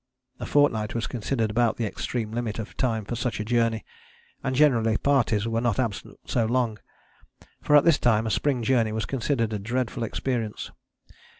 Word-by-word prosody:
A - - -5
fortnight 115 -8 +2
was 115 - -1
considered 115 -2 -2
about 120 +1 +1
the 115 - -1
extreme 110 +1 -3
limit 115 -2 -3
of 110 - -7
time 115 -5 -1
for 120 - -4
such 120 -2 -2
a 105 - -3
journey, 115 -1 +1 0.6
and 130 -1 -1
generally 115 -6 +3
parties 115 -6 +1
were 115 0 0
not 120 -4 0
absent 115 -6 -3
so 115 -3 0
long; 120 -3 0 0.8
for 150 - +3
at 145 - +7
this 165 -3 +5
time 110 -2 +2
a 110 - -1
spring 130 -2 0
journey 115 -2 +2
was 110 0 -2
considered 120 -4 -1
a 105 - -2
dreadful 120 +3 -2
experience. 115 -1 -3
115 Hz, 180 wpm, -25 LUFS, 110-125 Hz, 0.8 s, at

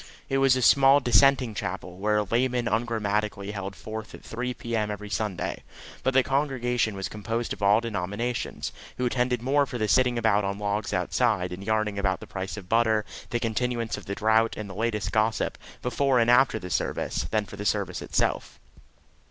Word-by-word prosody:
It 135 - +1
was 135 -1 +5
a 130 - 0
small 135 +3 +6
Dissenting 135 -2 +4
chapel, 90 -2 -5
where 105 +1 +2
a 105 - +2
layman 120 +3 0
ungrammatically 105 -3 -1
held 100 -1 -5
forth 110 0 -7
at - - -14
3 125 +2 -4
p.m. 115 -3 -2
every 105 0 -6
Sunday; 105 -5 -2 0.4
but 130 0 0
the 135 - +6
congregation 125 -5 0
was 95 0 -3
composed 115 +3 -3
of - - -11
all 100 +2 +5
denominations, 115 +2 -3 0.3
who 125 - -1
attended 125 -1 0
more 140 +2 +2
for 125 - -5
the 110 -2 0
sitting 125 +2 +3
about 110 -3 +2
on 100 0 -2
logs 105 0 -2
outside, 90 -1 +1
and 95 +2 -7
yarning 110 -1 0
about 95 -2 0
the - - -9
price 95 +1 -5
of 95 -4 -9
butter, 110 -1 +2 0.2
the 120 - -1
continuance 115 0 -1
of - - -10
the 100 - -3
drought, 110 +2 +2
and 110 - -5
the 95 - -8
latest 105 0 -1
gossip, 110 0 +1 0.3
before 130 +2 +2
and 120 0 +4
after 130 +2 +5
the 90 -1 -7
service, - - -1
than 110 -1 0
for - - -11
the 105 - -5
service - - -1
itself. - - -1
110 Hz, 190 wpm, -26 LUFS, 105-125 Hz, 0.4 s, small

